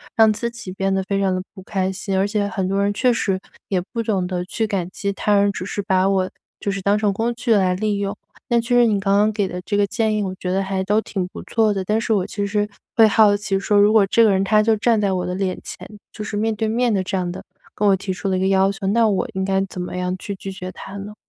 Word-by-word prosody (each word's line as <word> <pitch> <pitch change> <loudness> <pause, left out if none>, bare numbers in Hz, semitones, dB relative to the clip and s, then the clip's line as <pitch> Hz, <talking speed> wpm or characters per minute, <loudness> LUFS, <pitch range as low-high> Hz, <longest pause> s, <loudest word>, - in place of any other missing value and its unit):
让 220 -1 +6
自 220 +3 -2
己 235 -5 -9
变 195 +1 -1
得 190 - 0
非 195 +1 -1
常 190 -2 +1
地 185 - -2
不 190 - -11
开 190 -1 -1
心。 195 0 -3
而 190 - +3
且 205 0 0
很 195 -2 -2
多 195 +1 +1
人 200 0 +1
确 250 +5 +2
实， 200 -5 0 0.3
也 185 -2 0
不 230 - -2
懂 205 -5 0
得 180 -1 -3
去 220 +4 -2
感 195 -5 -2
激 200 +1 -3
他 205 +1 +1
人， 200 0 +3
只 185 - -5
是 205 - -3
把 190 -1 +2
我 190 -1 +1 0.3
就 200 - -1
是 195 0 -4
当 200 +2 +2
成 210 -1 +1
工 230 +4 -1
具 240 -1 +1
来 190 -3 +3
利 210 +1 -1
用。 200 0 -2 0.3
那 235 -1 +3
确 245 +1 0
实 240 - +6
你 210 -2 +2
刚 195 0 +2
刚 210 +1 +4
给 205 -1 0
的 180 -1 -5
这 205 - -1
个 205 0 +3
建 220 +1 0
议， 210 - 0
我 190 -1 -3
觉 180 - -3
得 195 +1 +1
还 190 0 -2
都 210 +2 +2
挺 190 -4 -3
不 - - -10
错 220 -2 +1
的。 195 -1 -2
但 210 +4 +1
是 225 - 0
我 195 -4 +1
其 205 0 -3
实 210 0 0 0.3
会 225 - +7
好 215 -1 +5
奇 200 -1 -1
说， 205 +1 +1
如 205 +1 +6
果 215 -2 +5
这 230 - +5
个 215 - +5
人 190 -1 +2
他 215 +2 +3
就 225 +1 +3
站 225 0 +2
在 200 -2 +1
我 185 -1 -1
的 180 - -3
脸 185 -1 -2
前， 180 - -9 0.3
就 215 - -6
是 210 - -4
面 220 +1 0
对 220 +1 -1
面 235 +1 +1
地 190 -2 +1
这 190 +1 -2
样 180 -1 -2
的 175 - -7 0.3
跟 210 - 0
我 - - +5
提 190 0 -4
出 195 +1 -3
了 185 - +1
一 - - -1
个 190 - +1
要 195 0 +3
求， 195 0 -5
那 225 +2 +3
我 195 - 0
应 190 -1 -2
该 190 0 +1
怎 180 - -6
么 180 0 -5
样 180 0 -1
去 200 - -6
拒 195 0 -7
绝 185 -1 -6
他 195 - -10
呢？ 200 +1 -7
200 Hz, 320 characters per minute, -21 LUFS, 190-215 Hz, 0.3 s, 会